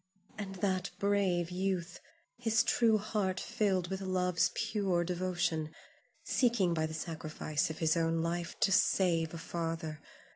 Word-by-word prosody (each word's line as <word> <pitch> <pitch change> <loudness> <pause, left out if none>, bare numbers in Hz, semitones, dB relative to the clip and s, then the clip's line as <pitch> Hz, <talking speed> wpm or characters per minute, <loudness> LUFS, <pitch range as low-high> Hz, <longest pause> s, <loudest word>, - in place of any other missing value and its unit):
And 195 -2 -6
that 185 -1 0
brave 190 -4 +1
youth, 180 -1 -2 0.4
his 225 -1 +2
true 230 -1 +4
heart 200 -3 -1
filled 190 -4 0
with 190 0 -3
love's 180 -2 +1
pure 200 -6 0
devotion, 175 -3 -1 0.5
seeking 230 -9 +2
by 160 -1 0
the 155 - -6
sacrifice 155 -1 -2
of 160 - -5
his 160 0 +2
own 165 0 +1
life 170 +1 -3
to - - +4
save 170 -4 +3
a 170 - -6
father! 165 -2 -4
180 Hz, 140 wpm, -32 LUFS, 165-195 Hz, 0.5 s, true